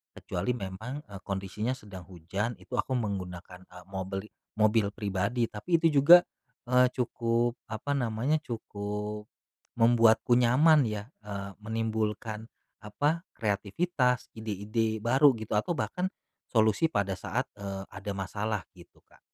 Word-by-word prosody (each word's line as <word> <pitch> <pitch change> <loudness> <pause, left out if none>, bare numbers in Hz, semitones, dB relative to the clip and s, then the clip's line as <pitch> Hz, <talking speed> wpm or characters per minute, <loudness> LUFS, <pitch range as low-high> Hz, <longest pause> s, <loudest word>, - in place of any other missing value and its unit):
Kecuali 100 +8 -2
memang, 110 +8 -6
eee, 100 -7 -10
kondisinya 100 +5 -2
sedang 100 -7 -11
hujan 95 +6 -3
itu 125 - -5
aku 130 0 0
menggunakan, 95 -5 -4
eee, 90 -1 -13
mobli 95 +1 -5 0.3
mobil 110 -1 +3
pribadi, 105 +4 -1
tapi 165 +11 +1
itu 160 -4 +3
juga, 175 +5 +9 0.5
eee, 125 0 +6
cukup, 120 -1 +1 0.2
apa 110 +6 -3
namanya, 125 +4 +1
cukup 105 -3 -5 0.5
membuatku 115 0 +5
nyaman 145 +6 +6
ya, 105 -1 -3 0.2
eee, 100 -1 -6
menimbulkan, 110 0 -2 0.3
apa, 145 +11 0 0.2
kreatifitas, 125 - 0
ide-ide 110 +1 -2
baru 135 +3 +5
gitu 110 -1 -8
atau 110 +11 +1
bahkan 180 0 -1 0.4
solusi 110 +6 +3
pada 100 -8 0
saat, - - -2
eee, 100 -1 -5
ada 100 +2 -5
masalah, 105 +1 -2
gitu 85 -2 -17
Kak. - - -23
110 Hz, 125 wpm, -29 LUFS, 100-125 Hz, 0.5 s, juga